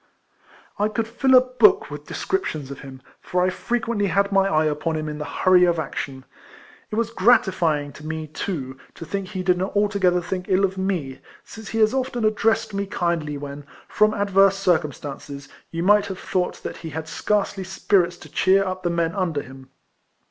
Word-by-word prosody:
I 210 Hz, -, +3 dB
could 220 Hz, +1 st, -2 dB
fill 260 Hz, +3 st, +3 dB
a 250 Hz, -, +9 dB
book 380 Hz, +12 st, +3 dB
with -, -, -8 dB
descriptions 155 Hz, -, -3 dB
of 140 Hz, -, -8 dB
him; 130 Hz, -1 st, -11 dB, 0.2 s
for 180 Hz, 0 st, -1 dB
I 185 Hz, -, +1 dB
frequently 230 Hz, -1 st, -1 dB
had 200 Hz, +3 st, +1 dB
my 195 Hz, 0 st, +3 dB
eye 155 Hz, -4 st, +2 dB
upon 155 Hz, +2 st, -1 dB
him 155 Hz, 0 st, -3 dB
in 150 Hz, 0 st, -5 dB
the 150 Hz, -, -4 dB
hurry 180 Hz, +5 st, +4 dB
of 175 Hz, -1 st, +3 dB
action. 135 Hz, -4 st, -5 dB, 0.6 s
It -, -, -4 dB
was 230 Hz, 0 st, 0 dB
gratifying 185 Hz, -10 st, +2 dB
to 155 Hz, -, -10 dB
me, 160 Hz, 0 st, -4 dB
too, 145 Hz, -4 st, -5 dB, 0.2 s
to 165 Hz, -, -8 dB
think 195 Hz, +3 st, -4 dB
he 185 Hz, -1 st, -4 dB
did 180 Hz, 0 st, +2 dB
not 190 Hz, +3 st, -3 dB
altogether 200 Hz, -3 st, +2 dB
think 180 Hz, +1 st, -4 dB
ill 190 Hz, +1 st, +4 dB
of 190 Hz, 0 st, -3 dB
me, 185 Hz, -9 st, -2 dB, 0.2 s
since 220 Hz, -2 st, -10 dB
he 225 Hz, -, -3 dB
has 215 Hz, +1 st, +4 dB
often 255 Hz, -3 st, -1 dB
addressed 215 Hz, 0 st, +1 dB
me 200 Hz, 0 st, -2 dB
kindly 170 Hz, -6 st, -1 dB
when, 140 Hz, 0 st, -7 dB, 0.2 s
from 215 Hz, +1 st, +2 dB
adverse 195 Hz, -1 st, +3 dB
circumstances, 145 Hz, -6 st, -2 dB, 0.2 s
you 165 Hz, 0 st, -3 dB
might 205 Hz, +2 st, +4 dB
have 190 Hz, -2 st, -5 dB
thought 185 Hz, -1 st, -2 dB
that -, -, -5 dB
he 165 Hz, -, -7 dB
Uad 160 Hz, +1 st, -5 dB
scarcely 195 Hz, +3 st, -1 dB
spirits 190 Hz, -1 st, +1 dB
to -, -, -13 dB
cheer 195 Hz, +1 st, +3 dB
up 185 Hz, 0 st, -4 dB
the 175 Hz, -, -1 dB
men 170 Hz, -1 st, 0 dB
under 170 Hz, -7 st, -1 dB
him. 130 Hz, 0 st, -13 dB
185 Hz, 190 wpm, -23 LUFS, 155-205 Hz, 0.6 s, a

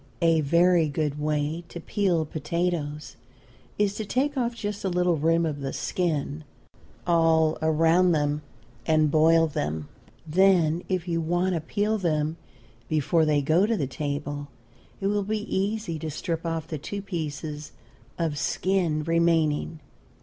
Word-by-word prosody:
A 165 Hz, -1 st, +4 dB
very 170 Hz, +2 st, +3 dB
good 150 Hz, 0 st, -2 dB
way 150 Hz, +2 st, -1 dB
to 170 Hz, -, -7 dB
peel 175 Hz, -2 st, 0 dB
potatoes 155 Hz, -1 st, -3 dB, 0.6 s
is 205 Hz, -1 st, +2 dB
to 220 Hz, -, -2 dB
take 270 Hz, +7 st, 0 dB
off 240 Hz, -2 st, -1 dB
just 205 Hz, -3 st, -4 dB
a 195 Hz, -, 0 dB
little 180 Hz, -1 st, +2 dB
rim 165 Hz, +2 st, +2 dB
of 150 Hz, -3 st, -3 dB
the 135 Hz, -1 st, -4 dB
skin 155 Hz, -3 st, -2 dB, 0.6 s
all 165 Hz, -2 st, +3 dB
around 165 Hz, +3 st, +3 dB
them 150 Hz, -2 st, 0 dB, 0.5 s
and 155 Hz, -2 st, +3 dB
boil 165 Hz, +1 st, +5 dB
them; 75 Hz, -, -3 dB, 0.4 s
then 170 Hz, -1 st, +3 dB
if 185 Hz, -2 st, -1 dB
you 165 Hz, -1 st, 0 dB
want 175 Hz, +3 st, 0 dB
to 165 Hz, -, -1 dB
peel 210 Hz, +6 st, -1 dB
them 155 Hz, -3 st, 0 dB, 0.5 s
before 155 Hz, +2 st, +2 dB
they 150 Hz, -2 st, +2 dB
go 165 Hz, +8 st, +3 dB
to 225 Hz, -1 st, +1 dB
the 145 Hz, -, 0 dB
table, 145 Hz, +1 st, -4 dB, 0.5 s
it 195 Hz, -, -4 dB
will 205 Hz, +1 st, +1 dB
be 210 Hz, +1 st, -2 dB
easy 195 Hz, -4 st, -1 dB
to 155 Hz, -, -4 dB
strip 165 Hz, +2 st, -3 dB
off 165 Hz, -1 st, -2 dB
the 155 Hz, -3 st, -5 dB
two 200 Hz, +7 st, -5 dB
pieces 155 Hz, -4 st, -5 dB, 0.5 s
of 160 Hz, -4 st, -1 dB
skin 175 Hz, -5 st, 0 dB
remaining. 165 Hz, -1 st, +1 dB
165 Hz, 150 wpm, -26 LUFS, 150-180 Hz, 0.6 s, boil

